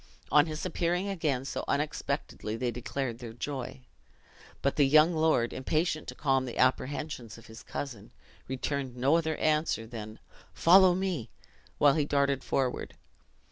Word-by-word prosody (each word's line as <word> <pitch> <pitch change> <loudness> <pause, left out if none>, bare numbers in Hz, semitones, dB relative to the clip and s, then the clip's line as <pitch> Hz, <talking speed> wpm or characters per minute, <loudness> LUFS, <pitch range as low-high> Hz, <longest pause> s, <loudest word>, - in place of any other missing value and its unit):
On 150 +1 +6
his 155 +1 -5
appearing 180 +2 -1
again 150 -9 -1
so - - -4
unexpectedly, 140 -6 -2
they 120 +1 -1
declared 120 0 -4
their 120 -3 -8
joy; 125 - -5 0.8
but 140 - +1
the 145 -2 +4
young 155 +4 +6
lord, 155 -7 +2
impatient 155 +4 -1
to - - -6
calm 135 -2 +1
the 120 - -6
apprehensions 130 -2 -1
of 115 - -15
his 110 +1 -11
cousin, 125 -8 -6 0.4
returned 130 -1 -3
no 135 +5 +3
other 160 -1 -1
answer 155 -7 +1
than 110 -2 -8 0.4
"Follow 185 +1 +6
me!" 180 - -2 0.5
while 145 -1 +5
he 150 -1 +1
darted 140 -2 +1
forward. 130 -2 -2
140 Hz, 145 wpm, -29 LUFS, 125-155 Hz, 0.8 s, On